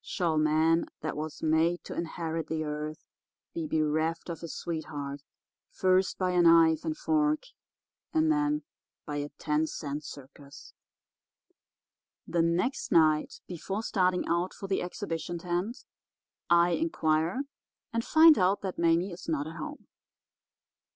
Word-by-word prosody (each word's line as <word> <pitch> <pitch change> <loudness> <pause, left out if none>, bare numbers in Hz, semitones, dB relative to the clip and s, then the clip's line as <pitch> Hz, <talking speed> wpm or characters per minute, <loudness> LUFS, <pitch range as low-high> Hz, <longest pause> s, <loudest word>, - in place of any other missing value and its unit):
Shall 165 -4 0
man 155 +2 +3 0.2
that 155 - -3
was 155 0 -6
made 160 +2 +2
to - - -7
inherit 165 -1 -3
the 160 0 -2
earth 150 0 -5 0.5
be 165 -2 -3
bereft 155 +2 0
of 165 - -6
his 170 - -7
sweetheart 145 -4 -5 0.5
first 185 0 +2
by 185 -1 0
a 180 -1 +3
knife 165 -1 +5
and 315 -1 -3
fork 305 -1 +1 0.7
and 315 -1 +3
then 295 0 +1 0.4
by 145 -1 -4
a 145 0 -3
ten 150 +1 0
cent 150 -1 -5
circus?' 140 0 -12 1.5
"The 170 - +1
next 175 +10 0
night 155 -2 +3
before 190 +4 -4
starting 185 -4 +1
out 170 +2 0
for - - -8
the 195 - 0
exhibition 175 -1 -4
tent 180 +8 -3 0.6
I 170 0 +5
inquire 165 - 0 0.5
and 230 0 0
find 315 +2 +7
out 185 +2 +2
that 190 -3 -5
Mame 170 0 +3
is 175 0 -8
not 150 -3 0
at 160 +1 -8
home. 300 -1 -7
170 Hz, 135 wpm, -29 LUFS, 155-185 Hz, 1.5 s, find